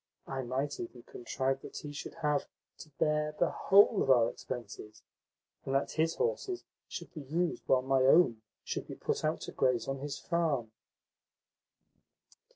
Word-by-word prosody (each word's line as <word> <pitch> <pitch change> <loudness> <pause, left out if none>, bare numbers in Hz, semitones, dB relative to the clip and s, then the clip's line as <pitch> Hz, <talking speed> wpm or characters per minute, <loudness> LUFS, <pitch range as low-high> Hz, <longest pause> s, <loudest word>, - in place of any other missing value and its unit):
I 135 -1 -3
might 130 +3 -2
even 120 +1 -7
contrive 135 +2 -2
that - - -9
he 150 - -6
should 145 - -7
have 150 -1 +1 0.3
to 155 - -10
bear 150 0 +1
the 175 - +2
whole 200 +1 +5
of - - 0
our 120 -3 +5
expenses, 110 -3 -8 0.6
and 135 - -2
that 135 - +1
his 165 +1 +1
horses 465 -6 -1 0.2
should - - -7
be 155 - -6
used 165 +6 -1
while 130 -1 +4
my 135 0 +2
own 130 -4 +5 0.2
should - - -4
be - - -7
put - - -2
out - - 0
to - - -6
graze 125 -3 +1
on 135 0 -2
his 145 +1 -4
farm." 155 -10 0
135 Hz, 165 wpm, -32 LUFS, 130-160 Hz, 0.6 s, whole